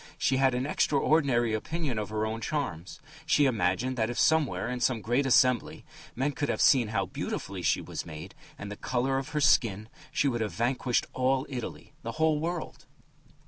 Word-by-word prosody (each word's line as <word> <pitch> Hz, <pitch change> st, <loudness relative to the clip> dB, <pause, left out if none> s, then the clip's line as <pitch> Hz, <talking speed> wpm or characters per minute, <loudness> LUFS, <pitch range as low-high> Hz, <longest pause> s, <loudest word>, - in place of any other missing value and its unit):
She 130 Hz, -, +1 dB
had 130 Hz, -1 st, +3 dB
an 125 Hz, +1 st, -1 dB
extraordinary 140 Hz, -5 st, +2 dB
opinion 135 Hz, +1 st, -2 dB
of 105 Hz, -2 st, -4 dB
her 110 Hz, 0 st, -1 dB
own 110 Hz, +1 st, -4 dB
charms; 105 Hz, -, -4 dB, 0.3 s
she 145 Hz, -2 st, +4 dB
imagined 115 Hz, +1 st, 0 dB
that 110 Hz, -1 st, +1 dB
if 120 Hz, -, -4 dB
somewhere, 160 Hz, -6 st, +2 dB
in 125 Hz, 0 st, -3 dB
some 120 Hz, -1 st, +1 dB
great 120 Hz, +6 st, 0 dB
assembly, 125 Hz, -1 st, +2 dB, 0.3 s
men 135 Hz, +4 st, 0 dB
could 145 Hz, 0 st, -3 dB
have -, -, -1 dB
seen 125 Hz, -5 st, +5 dB
how 100 Hz, -3 st, -1 dB
beautifully 95 Hz, +1 st, -5 dB
she 85 Hz, -, +1 dB
was -, -, -6 dB
made 80 Hz, +3 st, -9 dB, 0.2 s
and 100 Hz, 0 st, -7 dB
the -, -, -5 dB
colour 130 Hz, +4 st, -1 dB
of 135 Hz, -, -6 dB
her 150 Hz, -, -1 dB
skin, 110 Hz, -6 st, +3 dB, 0.2 s
she 145 Hz, -, +1 dB
would 120 Hz, -4 st, -1 dB
have 110 Hz, -, -2 dB
vanquished 125 Hz, +1 st, 0 dB
all 130 Hz, +1 st, +1 dB
Italy, 125 Hz, -4 st, -7 dB
the 115 Hz, -, -5 dB
whole 160 Hz, -1 st, +2 dB
world. 170 Hz, +1 st, -5 dB
125 Hz, 185 wpm, -28 LUFS, 110-140 Hz, 0.3 s, seen